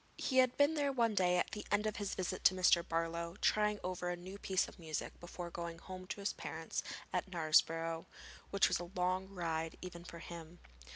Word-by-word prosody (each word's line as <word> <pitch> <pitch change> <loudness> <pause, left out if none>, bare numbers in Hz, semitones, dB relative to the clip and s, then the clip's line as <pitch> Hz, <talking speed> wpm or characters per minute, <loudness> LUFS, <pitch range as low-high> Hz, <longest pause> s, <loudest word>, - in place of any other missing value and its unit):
] - - -32
He 260 - +2
had 255 -1 +4
been 285 +2 +5
there 290 -3 +1
one 235 -4 +2
day 180 -2 +3
at - - +1
the 210 -1 -4
end 205 +1 +3
of 215 - -1
his 205 -1 -2
visit 185 -2 -2
to 185 - +7
Mr. 180 -2 +5
Barlow, 170 +1 -2
trying 210 -1 +3
over 180 -1 -2
a 175 - 0
new 185 +3 -9
piece 190 -2 +1
of - - -13
music 160 -2 -4
before 175 0 -6
going 170 -1 -4
home 185 +1 -8
to 200 - -5
his 200 - 0
parents - - -4 0.3
at - - 0
Knaresborough, 165 -1 +2 0.4
which 200 - +4
was - - +1
a 175 -1 -6
long 185 +1 +1
ride 165 -4 -2
even 175 -2 -7
for 170 - -9
him. 170 0 -9
180 Hz, 215 wpm, -36 LUFS, 170-200 Hz, 0.4 s, to